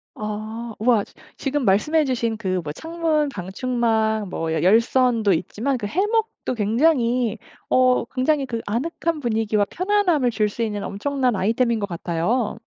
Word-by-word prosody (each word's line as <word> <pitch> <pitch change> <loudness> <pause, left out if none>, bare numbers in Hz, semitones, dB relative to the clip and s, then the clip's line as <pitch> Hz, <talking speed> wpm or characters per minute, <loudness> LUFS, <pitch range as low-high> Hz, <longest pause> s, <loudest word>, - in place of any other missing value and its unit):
아 215 +2 -5
우와. 225 -2 +3
지 - - -17 0.2
지금 285 0 -1
말씀해 300 +11 +3
주신 235 -4 -1
그 185 -4 -1
뭐 150 - -4
창문 320 - -1
방충망 220 0 -1
뭐 165 -2 -3
열선도 220 - +3
있지만 235 +10 -1
그 215 - -5
해먹도 420 - -1
굉장히 235 +1 +2 0.3
어 255 -1 +3
굉장히 270 +3 0
그 230 -3 -4
아늑한 320 +8 -2
분위기와 220 -3 +1
편안함을 365 -9 +1
줄 215 -2 +1
수 230 - -3
있는 210 -2 -3
엄청난 255 +3 -1
아이템인 230 +4 +1
것 200 - -2
같아요. 180 +7 -1
235 Hz, 295 characters per minute, -22 LUFS, 210-270 Hz, 0.3 s, 우와